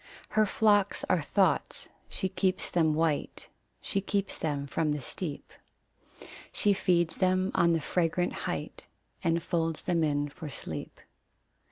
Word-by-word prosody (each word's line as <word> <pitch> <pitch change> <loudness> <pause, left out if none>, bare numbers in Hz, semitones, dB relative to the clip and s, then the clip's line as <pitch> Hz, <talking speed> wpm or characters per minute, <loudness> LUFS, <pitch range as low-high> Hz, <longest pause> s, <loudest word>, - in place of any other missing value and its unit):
Her 215 0 +3
flocks 205 -2 +3
are 175 - +3
thoughts. 180 +1 +1 0.2
She 190 - -2
keeps 185 0 0
them 160 -3 +3
white; 160 -2 -1 0.3
She 195 - -1
keeps 200 0 -1
them 145 -3 -2
from 150 +2 0
the 150 - -2
steep; 145 +3 -5 1.0
She 205 - +3
feeds 175 -3 +1
them 185 0 +2
on 170 0 +4
the 165 - +1
fragrant 175 +2 0 0.2
height, - - -5 0.4
And 165 -1 +1
folds 165 -3 -1
them 170 -2 +1
in 145 -1 +1
for 155 +1 -8
sleep. 80 - -7
170 Hz, 140 wpm, -29 LUFS, 155-190 Hz, 1.0 s, on